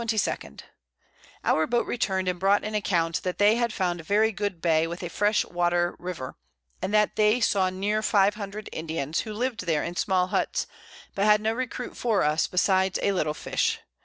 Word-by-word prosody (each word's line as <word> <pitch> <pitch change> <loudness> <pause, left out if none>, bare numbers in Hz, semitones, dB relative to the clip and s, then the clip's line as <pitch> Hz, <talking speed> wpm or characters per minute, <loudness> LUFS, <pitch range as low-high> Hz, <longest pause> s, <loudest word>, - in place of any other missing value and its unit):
_ 215 - -2 0.8
Our 155 0 +2
Boat 240 0 +1
return'd 190 -5 -1
and 180 -1 -1
brought 195 +2 +3
an 215 - -4
Account, 170 -5 0
that 180 -1 -3
they 205 +1 +5
had 235 -1 0
found 180 -4 -1
a - - -8
very 215 +6 +2
good 205 -3 -3
Bay, 165 -1 +2
with 170 +2 -6
a 175 - -4
fresh 210 +4 +1
Water 175 0 0
River, 175 -8 -6 0.5
and - - -2
that 210 0 +2
they 215 +3 +4
saw 195 -4 +2
near 200 +3 -1
500 205 0 0
Indians, 160 -1 -3
who 215 - -4
lived 235 -5 -3
there 155 -3 +1
in 170 - -5
small 185 0 +1
Hutts, - - 0 0.5
but 200 - 0
had 210 0 +5
no 220 +1 0
Recruit 250 0 -5
for 225 -5 +1
us, 150 +2 +2
besides 190 0 +2
a 200 - +3
little 155 -5 -1
Fish. - - -1
195 Hz, 190 wpm, -26 LUFS, 175-210 Hz, 0.8 s, they